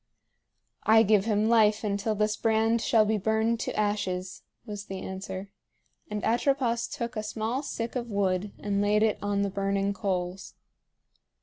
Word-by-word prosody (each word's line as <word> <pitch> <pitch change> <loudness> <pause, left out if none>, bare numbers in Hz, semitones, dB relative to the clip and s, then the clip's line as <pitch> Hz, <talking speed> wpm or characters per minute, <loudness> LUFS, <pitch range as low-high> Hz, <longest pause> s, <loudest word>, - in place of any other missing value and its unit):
"I 220 +1 +6
give 210 -1 +3
him 215 -1 +2
life 220 -2 +4
until 205 +1 -1
this 210 0 +1
brand 225 +1 +2
shall 220 -2 +4
be 215 0 +1
burned 220 +3 +1
to - - -3
ashes," 190 -3 -2 0.2
was 205 -2 -6
the 190 - -6
answer; 190 +1 -6 0.6
and 210 0 -3
Atropos 240 0 +1
took 240 -4 -5
a 215 - -1
small 220 +4 -2
stick 235 -5 -4
of 240 -1 -3
wood 200 -1 0
and 200 -1 -1
laid 210 +1 +3
it 220 -1 +1
on 205 0 0
the 200 - -1
burning 195 0 0
coals. 190 -2 -3
210 Hz, 160 wpm, -28 LUFS, 200-225 Hz, 0.6 s, I